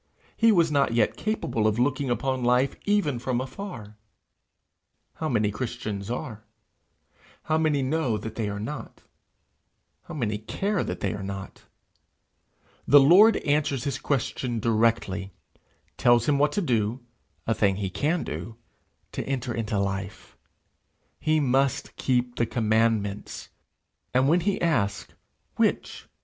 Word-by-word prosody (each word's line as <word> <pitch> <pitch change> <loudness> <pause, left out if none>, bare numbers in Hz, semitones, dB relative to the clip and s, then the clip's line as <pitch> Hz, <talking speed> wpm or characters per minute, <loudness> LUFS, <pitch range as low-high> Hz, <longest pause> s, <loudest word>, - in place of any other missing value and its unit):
He 230 0 +4
was 170 -5 +3
not 140 -5 +2
yet 115 - +2
capable 215 - -1
of 110 0 +1
looking 130 +2 0
upon 130 +2 -1
life 125 +2 +2
even 200 -12 +1
from 125 0 -1
afar! 130 - -7 1.2
How 155 - -2
many 110 -4 +1
Christians 105 -3 -5
are? 115 -3 -5 1.0
How 155 0 +1
many 150 -3 +1
know 130 -5 0
that 110 +1 -6
they 110 -3 -2
are 100 0 -4
not? 145 +8 -7 1.0
How 170 - -8
many 110 -7 -2
care 195 - -1
that - - -5
they - - -1
are 105 - -6
not? 95 0 -7 1.2
The 145 - +8
Lord 185 +11 +7
answers 145 -3 +1
his 140 -2 -2
question 125 -3 -2
directly, 110 -4 0 0.6
tells 120 -1 +4
him 145 -2 +3
what 150 +1 +3
to 205 - 0
do 115 -3 0 0.4
a 115 - +1
thing 100 -3 +2
he 95 -1 -3
can 160 - 0
do 85 +10 -6 0.6
to - - -4
enter 130 -3 -2
into 110 -2 -2
life: 100 0 -4 0.8
he 155 +1 +2
must 135 -1 0
keep 125 -1 0
the 120 - +1
commandments! 110 -3 0 0.7
and 130 +1 +4
when 170 +5 +4
he 190 +3 0
asks, 125 -13 0 0.4
'Which?' - - -1
125 Hz, 135 wpm, -26 LUFS, 110-145 Hz, 1.2 s, The